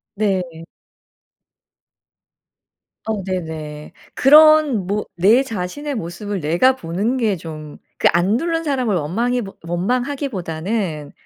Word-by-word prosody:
네. 185 -6 -2 2.4
어 215 -3 -2
네네. 160 -5 -5 0.2
그런 300 -6 +6
뭐 210 +1 -1
내 205 +8 +5
자신의 260 +6 -4
모습을 200 +2 -5
내가 175 - +3
보는 205 +5 -2
게 215 -7 0
좀 155 -2 -9 0.2
그 - - +3
안 180 +5 +2
누른 330 +2 -1
사람을 255 - 0
원망해보 210 +7 -2
원망하기보다는 190 - -2
200 Hz, 205 characters per minute, -20 LUFS, 170-250 Hz, 2.4 s, 그런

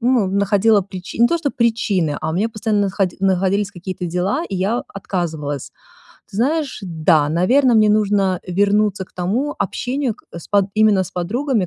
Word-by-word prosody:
ну, 245 -3 +2
находила 200 +2 +3
причи 185 +1 -9
не 235 - +6
то 340 +6 0
что 290 -3 -1
причины, 205 - 0
а 155 - -3
у - - -3
меня 210 +6 0
постоянно 215 -1 0
находи 195 -2 -1
находились 195 +1 +1
какие-то 180 -1 -6
дела, 185 - -1
и 190 - -2
я 205 +6 0
отказывалась. 160 -8 -4 0.6
Ты - - -7
знаешь, 285 +5 0
да, 160 -4 +2
наверно, 240 - +3
мне 215 -1 +5
нужно 205 -3 +2
вернуться 200 +1 +1
к - - -29
тому 220 +12 -1
общению 255 -1 -2
к - - -23
с 170 - -9
под 200 -2 +3
именно 215 -2 +4
с 185 - -7
подругами, 215 +4 -1
200 Hz, 175 wpm, -19 LUFS, 180-225 Hz, 0.6 s, не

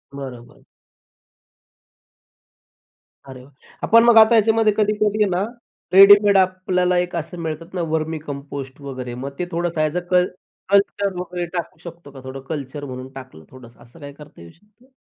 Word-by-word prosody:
बरोबर. 130 -4 -10 2.7
अरे 130 -1 -10
वा! 135 - -18 0.3
आपण 230 +1 +5
मग 235 -1 +5
आता 220 +1 +7
याच्यामध्ये 220 0 +3
कधी-कधी 210 0 +1
ना, 180 +1 -1 0.5
रेडीमेड 200 +1 +7
आपल्याला 185 -1 +1
एक 175 0 -2
असं 170 +1 -5
मिळतात 165 +2 -6
ना, 180 - -3
वर्मी 160 0 -2
कंपोस्ट 140 -2 -8
वगैरे. 130 -3 -7
मग 135 +3 -6
ते 180 - -1
थोडंसं 170 -1 -2
ॲज 155 +2 -1
अ - - +2
क 180 0 +5 0.5
कल्चर 200 0 +2
वगैरे 180 0 -4
टाकू 165 -2 -6
शकतो 170 -3 -11
का, 135 - -12
थोडं 130 +1 -8
कल्चर 145 -1 -6
म्हणून 130 +1 -8
टाकलं 130 -12 -14
थोडंसं 120 -2 -15
असं 120 +7 -19
काही 145 -1 -10
करता 150 -11 -15
येऊ 85 0 -13
शकतं? 215 +7 -29
170 Hz, 155 wpm, -20 LUFS, 140-195 Hz, 2.7 s, आता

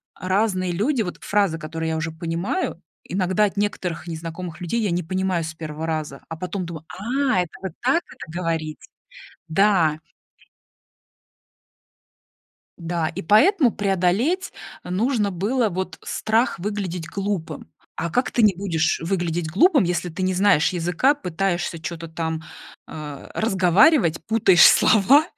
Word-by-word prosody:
разные 185 -1 0
люди, 230 - 0
вот 180 -5 -4
фразы, 200 -5 +1
которые 160 0 -4
я 160 - -1
уже 160 +1 -3
понимаю, 170 - -3 0.2
иногда 185 +2 +1
от 200 - -4
некоторых 190 -5 -2
незнакомых 165 +1 -6
людей 200 +7 -1
я 205 -4 0
не 175 - 0
понимаю 185 0 -1
с 155 0 -5
1 155 0 -6
раза, 155 -3 -3
а 165 - -6
потом 180 +1 -4
думаю: 160 -2 -8
"А, 255 +2 0
это 175 - -4
вот 190 - -3
так 270 +8 +2
это - - -11
говорите?" 160 -3 -3 0.6
Да. 165 -3 +3 2.8
Да, 170 -2 -2
и 170 - -6
поэтому 265 - +5
преодолеть 205 - 0 0.3
нужно 205 +3 0
было 220 +7 0
вот 190 0 -4
страх 225 0 0
выглядеть 180 -3 -4
глупым. 195 -2 -4 0.3
А 170 - -3
как 250 +8 0
ты 240 - +2
не 210 -4 +5
будешь 170 -4 0
выглядеть 170 -3 -1
глупым, 275 - +4
если 175 +1 -1
ты 175 +3 -5
не 185 0 +1
знаешь 180 -5 +4
языка, 180 - +2
пытаешься 180 - -2
чё-то 165 0 -6
там, 160 0 -3 0.5
э, 150 -2 -8
разговаривать, 190 - +4
путаешь 200 -5 +6
слова, 260 +8 +5
180 Hz, 135 wpm, -23 LUFS, 165-210 Hz, 2.8 s, путаешь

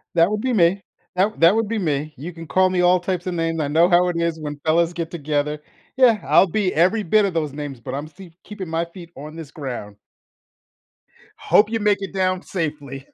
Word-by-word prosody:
That 170 +4 +4
would 210 0 -1
be 255 -1 -1
me. 190 0 +3 0.3
That 200 +4 0
that 170 +5 +6
would 225 -2 0
be 225 0 -2
me. 155 -4 -2
You 165 +7 -7
can 165 -1 -10
call 185 +4 +3
me 180 -1 0
all 180 0 +4
types 180 0 -3
of 180 - -2
names, 165 -1 -1
I 145 - -1
know 165 +4 +4
how 180 +1 +4
it 170 - -3
is 170 -1 -1
when 150 -1 -6
fellas 165 +2 +2
get 170 -1 -5
together. 150 -2 -2 0.4
Yeah, 235 -5 +5
I'll 195 - +5
be 190 +1 -1
every 190 +7 +2
bit 210 +4 +3
of 190 - -2
those 150 -4 -1
names, 145 -4 -6
but 130 +2 -7
I'm 145 +2 -4
see 175 +1 -14
keeping 200 -5 -8
my 165 +1 -1
feet 170 0 -13
on 150 +3 -9
this 160 -3 -9
ground. 120 -8 -7 1.4
Hope 210 +1 +3
you 225 0 -1
make 205 -1 +1
it 195 - -6
down 185 -1 0
safely. 145 -6 -5
170 Hz, 225 wpm, -21 LUFS, 150-190 Hz, 1.4 s, that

